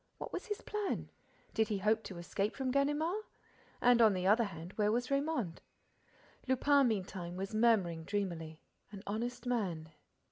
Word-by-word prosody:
What - - -7
was - - -4
his 415 -1 -3
plan? 420 -2 -3 0.4
Did 220 -1 +2
he 210 - -1
hope 215 +3 +2
to 190 - -7
escape 195 +4 -2
from 265 -2 -1
Ganimard? 295 +8 +1 0.6
And, 245 -1 +6
on 220 -3 +7
the 185 0 -2
other 220 +4 +5
hand, 170 -1 -8
where 210 -1 +2
was 245 +2 0
Raymonde? 275 - 0 0.9
Lupin, 275 +1 +4
meantime, 185 -5 -3
was 195 +2 -4
murmuring, 210 -8 +3
dreamily: 170 -6 -3 0.3
"An 200 -1 -9
honest 235 +5 -3
man. 185 -10 -1
215 Hz, 155 wpm, -34 LUFS, 185-250 Hz, 0.9 s, on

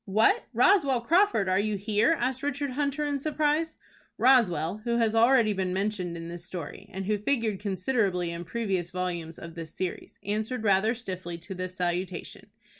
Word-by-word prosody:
"What, 210 +3 +3
Roswell 270 - +4
Crawford, 340 - +3
are 185 +1 +2
you 210 0 0
here?" 215 +10 +2
asked 255 +1 -1
Richard 285 -1 -2
Hunter, 285 +2 -1
in 285 -1 -1
surprise. 310 +2 0 0.4
Roswell, 210 - +3
who 235 0 0
has 225 -2 +2
already 230 -1 +5
been 190 -2 -1
mentioned 190 -3 -2
in 165 0 -7
this 170 0 -7
story, 175 -4 -7
and 190 +1 -5
who 210 +1 0
figured 220 -3 0
considerably 195 -3 0
in 170 0 -5
previous 190 -3 -2
volumes 175 -3 -4
of 165 -1 -9
this 165 -2 -8
series, 185 -1 -5
answered 220 +4 -2
rather 210 +3 +3
stiffly 185 -7 -6
to 175 +3 -8
this 185 0 -5
salutation. 180 0 -3
205 Hz, 170 wpm, -28 LUFS, 180-250 Hz, 0.4 s, already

